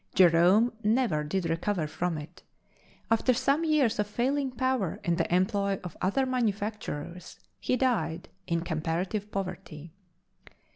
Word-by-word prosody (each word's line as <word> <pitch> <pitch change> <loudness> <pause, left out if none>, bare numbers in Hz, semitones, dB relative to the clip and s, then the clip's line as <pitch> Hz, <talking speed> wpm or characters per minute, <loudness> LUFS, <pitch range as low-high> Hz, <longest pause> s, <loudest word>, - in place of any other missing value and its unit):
Jerome 185 +7 +5
never 215 -8 +2
did 175 +3 -1
recover 165 +1 -1
from 170 +2 -2
it; 150 0 -10 0.7
after 230 +2 +3
some 275 +5 +2
years 300 -9 +2
of 210 - +1
failing 265 +6 0
power 255 -7 -1
in 170 -3 +1
the 170 - -1
employ 195 +2 +1
of 180 -3 -7
other 200 +9 +1
manufacturers, 205 - -3 0.2
he 255 - 0
died 220 -9 0 0.2
in 170 -1 0
comparative 175 +6 -2
poverty. 175 -5 -6
195 Hz, 130 wpm, -28 LUFS, 170-240 Hz, 0.7 s, Jerome